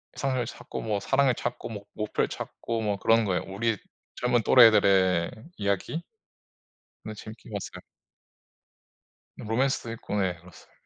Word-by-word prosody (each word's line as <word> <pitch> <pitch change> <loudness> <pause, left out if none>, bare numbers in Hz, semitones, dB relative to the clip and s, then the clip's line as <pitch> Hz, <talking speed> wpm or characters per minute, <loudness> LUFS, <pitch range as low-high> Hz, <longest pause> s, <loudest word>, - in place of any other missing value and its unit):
이성을 130 -3 -1
찾고 - - -7
뭐 105 -2 -1
사랑을 135 +4 +3
찾고 120 +1 -4
뭐 110 -3 -5
목 105 0 -3
목표를 - - +1
찾고 115 -1 -4
뭐 105 -2 0
그러는 115 +2 +3
거예요. 95 -3 0
우리 105 +3 -1 0.4
젊은 125 -1 +2
또래들의 100 -8 +6 0.3
이야기? 100 - -1 1.0
네 110 - -5
재밌게 110 +2 -11
봤어요. 100 -2 -6 1.5
로맨스도 120 +1 -1
있고 110 -2 -5
네 90 -2 0
그렇습니다. 85 0 -17
110 Hz, 305 characters per minute, -27 LUFS, 100-120 Hz, 1.5 s, 또래들의